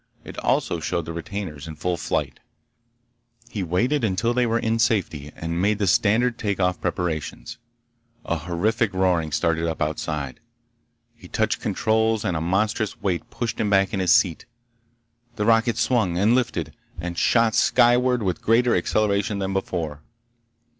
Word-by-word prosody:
It - - -10
also 85 - 0
showed 85 +1 -2
the 80 - -6
retainers 85 -4 -6
in 80 - -7
full 90 +4 -1
flight. - - -2 1.1
He 105 - -3
waited 120 - 0
until 110 +3 +1
they 125 0 +2
were 115 0 +1
in 115 0 0
safety 95 -11 0
and 85 +1 -3
made 105 +2 +2
the 105 - 0
standard 115 +6 +2
take 100 -3 -2
off 90 -2 0
preparations. 80 - -3 0.7
A 85 - -1
horrific 95 +6 -1
roaring 90 -4 +1
started 80 +2 0
up 80 - -3
outside. 75 -2 -3 0.8
He - - -14
touched - - -1
controls 110 0 +1
and 90 - 0
a 80 - -1
monstrous 105 +5 0
weight 90 -4 -2
pushed 115 -2 -4
him 105 - +1
back 95 0 +3
in 100 - -1
his 90 -2 +2
seat. 85 -5 +3 0.9
The 105 - -1
rocket 115 0 +3
swung, 105 -9 +1
and 105 +5 +3
lifted, 90 - -1 0.3
and 85 +1 -4
shot 115 +4 +3
skyward 125 +1 +3
with 90 -4 -2
greater 120 +2 +3
acceleration 100 +3 +1
than 95 -1 -2
before. 80 -6 -3
95 Hz, 155 wpm, -23 LUFS, 85-110 Hz, 1.1 s, back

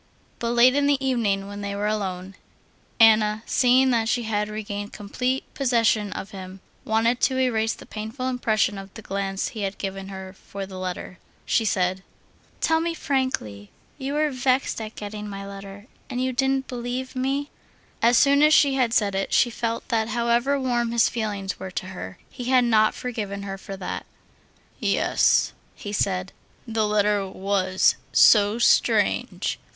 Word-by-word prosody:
But 235 0 -1
late 240 +2 +6
in 285 0 +2
the 285 -1 +3
evening, 225 -7 0
when 205 0 -7
they 200 0 -4
were 205 +1 -2
alone, 195 -3 -3 0.7
Anna, 215 -1 +5
seeing 255 +1 +4
that 225 -2 +1
she 240 -1 +1
had 210 -1 -1
regained 205 -1 -5
complete 250 +6 -2
possession 230 -6 +1
of 195 - -7
him, 190 -1 -9 0.2
wanted 230 +3 +1
to 260 - +2
erase 225 -4 +1
the - - -13
painful 220 +5 -5
impression 215 -5 0
of 195 0 -10
the 220 - -9
glance 195 -1 -2
he 220 - -7
had 195 0 -3
given 195 -1 -5
her 190 -1 -8
for 195 +1 -10
her 195 0 -6
letter. 185 -1 -6 0.3
She 225 - +1
said: 185 -2 0 0.6
"Tell 320 -1 +3
me 335 0 -2
frankly, 260 - -2 0.3
you 270 +1 -3
were 305 0 +1
vexed 255 -1 0
at 215 0 -7
getting 210 0 -6
my 195 0 -6
letter, 200 0 -9 0.2
and 250 -2 -3
you 260 0 0
didn't 265 +1 0
believe 250 +2 -4
me?" 275 +3 -1 0.5
As 235 +1 +5
soon 280 +2 +5
as 305 +1 +6
she 280 -2 +5
had 250 -4 +1
said 205 -2 +2
it, 195 0 -2
she 240 - +3
felt 230 0 -3
that 225 -3 +1
however 235 +4 +1
warm 240 -3 0
his 235 -1 +4
feelings 205 -4 -3
were 190 - -6
to 180 - -4
her, 95 - -8
he 245 - -8
had 255 0 +4
not 215 -2 +3
forgiven 205 -5 -4
her 195 -1 -5
for 195 0 -8
that. 185 - -5 0.7
"Yes," - - +2 0.2
he 205 - -7
said, 185 -2 -1 0.3
"the 220 -1 0
letter 210 -1 +1
was 190 -1 +1
so 210 0 +6
strange. 240 - +2
220 Hz, 170 wpm, -24 LUFS, 200-250 Hz, 0.7 s, late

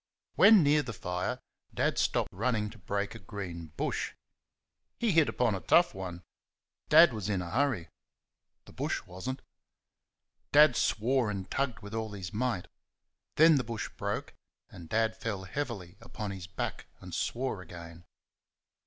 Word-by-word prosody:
When 205 -2 +7
near 150 +1 +4
the 125 -5 -6
fire 90 0 -3 0.3
Dad - - +1
stopped - - +1
running 105 +1 0
to 110 - -14
break 100 +2 -2
a 115 - -9
green 90 -4 -7
bush. - - -2 0.8
He 230 -3 +1
hit 160 -3 +4
upon 120 -3 +1
a 95 - -2
tough 170 - +4
one. 90 -2 -6 0.7
Dad - - +8
was 105 -2 -4
in 100 -3 +1
a 85 -1 -5
hurry. 125 -9 +1 0.8
The - - -14
bush - - -2
was 95 +8 -7
n't. 130 - -5 1.1
Dad 150 -3 +7
swore 120 +2 +1
and 95 -2 -5
tugged 130 -6 -1
with 100 +1 -9
all 110 -2 -3
his 95 -1 -6
might. 110 -5 -1 0.7
Then 160 0 +7
the 130 - 0
bush 115 -1 -4
broke - - -3 0.4
and 85 -3 -11
Dad 110 0 +1
fell 110 -4 -4
heavily 95 -5 -5
upon 110 -3 -6
his 95 -2 -7
back 95 - -4
and - - -10
swore 125 -5 -2
again. 85 -1 -11
105 Hz, 155 wpm, -30 LUFS, 95-125 Hz, 1.1 s, Dad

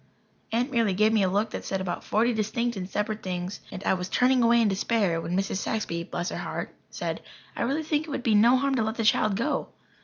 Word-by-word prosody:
Aunt 245 +5 0
merely 230 -6 +2
gave 215 +3 +3
me 220 - +3
a 190 - +3
look 205 +4 0
that - - -5
said 190 - -2
about 190 -2 -3
forty 235 +3 +2
distinct 230 +2 -1
and 185 -1 -5
separate 210 +2 -2
things, 180 +1 -4
and 185 - -7
I - - +2
was 180 0 -3
turning 255 0 +3
away 235 0 +5
in 230 - +4
despair 195 -3 +1
when 175 +2 -2
Mrs. 195 -1 -1
Saxby 180 -5 -2
bless 175 +1 -3
her - - -5
heart - - -5 0.2
said: - - -4 0.3
"I - - -4
really 280 +6 0
think 305 0 -1
it - - -8
would 275 -3 -3
be 230 - +2
no 235 +5 +6
harm 275 +1 +1
to 245 -4 +1
let 220 +1 -2
the 230 - -1
child 215 -1 +3
go." 275 +7 -1
220 Hz, 245 wpm, -27 LUFS, 190-240 Hz, 0.3 s, no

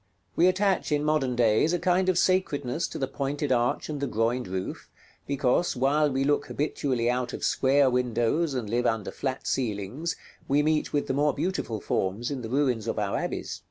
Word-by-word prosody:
We 175 - +5
attach, 190 -1 +1
in 145 0 +1
modern 150 -5 +1
days, 120 +7 +3
a - - +2
kind 185 +1 +2
of 185 - +2
sacredness 165 -6 +1
to - - -7
the 135 - 0
pointed 140 +1 -2
arch 120 -1 +1
and 150 -2 -4
the 140 - 0
groined 115 +2 0
roof, 95 0 -5 0.4
because, 140 +4 +1
while 145 +4 +2
we 135 +1 0
look 145 +1 +1
habitually 135 -5 -1
out 125 0 -1
of - - -6
square 135 +1 +3
windows 125 +5 +1
and 120 -4 -2
live 120 +3 +1
under 110 -3 -1
flat 130 -1 -4
ceilings, 120 - -2 0.3
we 145 +2 +3
meet 155 0 +1
with 145 - 0
the - - -2
more 145 0 +2
beautiful 150 - -2
forms 100 +7 -2
in 135 -3 -3
the 110 - -6
ruins 125 -4 0
of - - -2
our 105 -2 -1
abbeys. - - -3
135 Hz, 195 wpm, -27 LUFS, 120-150 Hz, 0.4 s, We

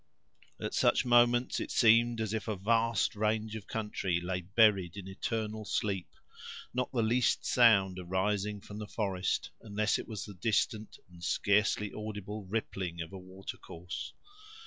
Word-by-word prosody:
At - - -4
such - - +3
moments, 120 0 +4
it - - -4
seemed 115 0 +4
as 110 -1 -2
if 110 0 -3
a 110 - -1
vast 115 +3 +1
range 110 +1 0
of 105 -3 -8
country 105 -5 -1
lay 90 +1 -3
buried 100 -2 +3
in 95 -2 -7
eternal 110 +2 -3
sleep; 100 -3 -1 0.7
not 125 0 -1
the 120 -3 +1
least 120 +2 +2
sound 100 -6 +4
arising 100 +3 -1
from 105 +1 -9
the 105 - -6
forest, 95 -4 -1
unless 105 -1 0
it - - -7
was 110 -4 -5
the 105 - -9
distant 110 +2 -1
and 85 -1 -15
scarcely 105 +4 +1
audible 105 -1 -6
rippling 95 -4 -3
of 80 +2 -6
a 95 - -7
water 95 +1 -9
course. 90 +2 -7
105 Hz, 155 wpm, -31 LUFS, 95-110 Hz, 0.7 s, moments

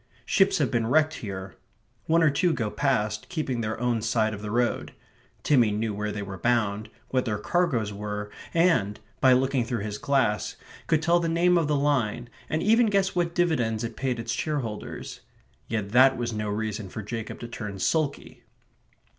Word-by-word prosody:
Ships - - +3
have - - +1
been 115 -2 +1
wrecked 155 +4 +3
here. 95 -4 -6 0.5
One 165 +1 +4
or 155 - +5
two 170 +4 +2
go 110 -7 -2
past, 105 -6 0
keeping 140 -8 -2
their 110 0 -3
own 120 -2 0
side 110 0 +1
of 105 - -7
the 105 - -5
road. 120 +2 0 0.5
Timmy 125 -7 +4
knew 105 +1 -1
where 105 +1 -3
they 105 -1 -4
were 95 -1 -7
bound, 110 -3 0 0.2
what 130 -1 0
their 105 -3 -1
cargoes 120 - 0
were, 105 0 -5 0.2
and, 165 - +2 0.2
by 130 -1 +6
looking 130 0 +2
through 115 -3 -3
his 105 -1 -4
glass, 130 -8 +1 0.3
could 160 -1 +2
tell 170 +1 +4
the 170 -1 -1
name 175 +2 +3
of 165 -3 +2
the 150 - +1
line, 125 -5 0 0.2
and 155 +1 -1
even 225 +3 +4
guess 195 -3 +1
what 170 -1 0
dividends 125 -11 +1
it 115 -1 -4
paid 130 -2 -2
its 115 - -3
shareholders. 130 -9 -4 0.5
Yet 110 -3 -3
that 130 +2 +6
was 120 -1 -2
no 105 -1 -2
reason 105 -1 -3
for 110 - -6
Jacob 115 +1 -5
to 120 - -5
turn 105 -4 -6
sulky. 145 - -1
120 Hz, 185 wpm, -26 LUFS, 105-150 Hz, 0.5 s, by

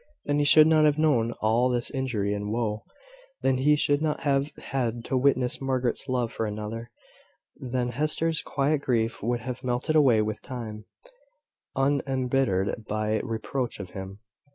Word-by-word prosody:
Then 145 0 +1
he 145 - +2
should 155 +1 +8
not 155 -1 +5
have 150 0 +3
known 140 -8 +2
of 120 - -7
all 115 +4 +3
this 120 -1 0
injury 120 -7 -1
and 105 0 -3
woe; 110 -2 -2 0.6
then 130 -1 +2
he 150 +3 +4
should 145 0 +1
not 155 -1 -1
have 140 0 +1
had 120 -3 -3
to - - -2
witness 130 -1 +2
Margaret's 130 0 -1
love 125 -3 -1
for 110 - -2
another: 110 +2 -5 0.7
then 125 -1 -2
Hester's 155 +5 0
quiet 140 +1 0
grief 115 -4 0
would 120 +2 -1
have 125 +2 -6
melted 125 +5 -1
away 125 -8 +5
with 105 0 -4
time, 110 -4 -7 0.9
unembittered 135 -7 0
by 110 +1 0
reproach 120 +1 -3
of 95 -3 -7
him. 95 +1 -8
125 Hz, 160 wpm, -26 LUFS, 110-140 Hz, 0.9 s, should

